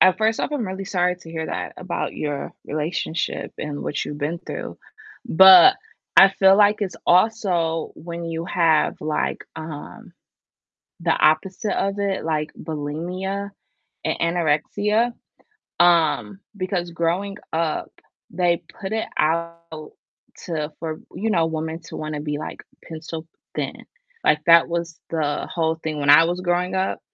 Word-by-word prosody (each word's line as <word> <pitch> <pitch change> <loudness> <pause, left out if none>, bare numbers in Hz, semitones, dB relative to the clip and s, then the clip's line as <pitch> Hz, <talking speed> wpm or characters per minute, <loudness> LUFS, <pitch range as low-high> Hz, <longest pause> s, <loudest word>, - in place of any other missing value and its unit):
at 185 -1 +5
first 220 +1 +2
off, - - -1
I'm 260 -7 -1
really 190 +1 -5
sorry 180 -2 0
to 165 -2 -13
hear 160 -1 -4
that - - -4
about - - -3
your 145 -2 -4
relationship 155 +2 -3
and 145 -1 -4
what 145 - -2
you've 145 - -6
been 155 +4 -2
through, - - -7 0.5
but 190 - +9 0.4
I 195 - +10
feel 190 0 +5
like 210 0 +5
it's 195 -3 -3
also 175 -5 +2
when 170 +1 -7
you 165 0 -4
have 165 -3 +2
like, 155 0 -2
um, 155 -2 -8 0.9
the 170 0 +2
opposite 185 +7 +2
of 195 +1 -1
it, 195 -3 -1
like 155 -1 -1
bulimia 180 +6 -4 0.5
and - - -1 0.2
anorexia, 205 +9 +1 0.7
um, 175 +2 +3 0.2
because 185 -2 -2
growing 175 +4 -1 0.2
up, 160 -1 -1 0.4
they 175 0 +1 0.2
put 190 - -4
it 220 - -1
out 170 -1 -2 0.5
to, 155 -3 -3
for, 160 -1 -4 0.2
you 225 - -1
know, 165 -6 +3
women 160 0 -3
to 165 - -9
wanna 155 -1 -4
be 150 0 -3
like 155 - -7 0.2
pencil 160 0 -7 0.3
thin, - - -4 0.4
like - - +3
that 170 -1 +7
was 170 -1 -4
the 150 -3 -1
whole 160 -1 +1
thing 155 -2 -4
when 145 0 0
I 155 +3 +9
was 175 +2 -2
growing 180 +1 0
up, 190 0 -1
170 Hz, 145 wpm, -22 LUFS, 155-190 Hz, 0.9 s, I